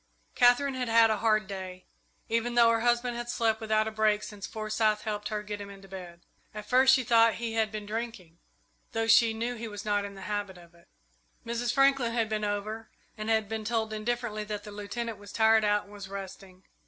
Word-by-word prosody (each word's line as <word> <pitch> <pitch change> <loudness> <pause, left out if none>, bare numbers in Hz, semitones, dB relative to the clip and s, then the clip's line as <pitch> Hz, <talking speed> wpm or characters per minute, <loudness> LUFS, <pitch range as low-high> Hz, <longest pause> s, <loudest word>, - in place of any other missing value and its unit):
Katherine 245 +3 +4
had 255 -1 -3
had 225 0 +5
a 215 - +1
hard 215 -2 +2
day, 185 -2 -7 0.4
even 230 +1 -1
though 235 -1 +6
her 230 - +2
husband 240 +1 +1
had 240 0 -5
slept 225 -2 0
without 215 0 +1
a - - -3
break 215 -1 +1
since 200 -2 -7
Forsyth 215 0 0
helped 210 -1 -3
her 210 -1 -3
get 205 0 -6
him 200 - -8
into 195 -1 -12
bed. 180 -3 -10 0.3
At 210 0 -6
first 260 +3 +5
she 260 - 0
thought 230 -1 +4
he 230 -1 -4
had 220 -1 +1
been 215 -1 -6
drinking, 210 -6 -6 0.5
though 225 0 0
she 225 0 +6
knew 230 +2 -3
he 230 -1 -6
was 205 -1 -8
not 205 -1 +1
in 200 0 -7
the 195 - -10
habit 205 -2 -4
of 170 -1 -16
it. 170 +1 -23 0.6
Mrs. 235 +1 -1
Franklin 275 -3 +3
had 230 -2 0
been 215 -1 -2
over 210 +2 -3 0.3
and 215 0 -5
had 220 -2 +2
been 220 +1 -4
told 220 0 -1
indifferently 215 0 -2
that 210 -1 -5
the 210 - -9
Lieutenant 210 +2 -5
was 205 0 -12
tired 220 0 +4
out 210 0 +2
and 205 - -17
was 200 -2 -9
resting. 190 -1 -9
215 Hz, 215 wpm, -29 LUFS, 205-230 Hz, 0.6 s, though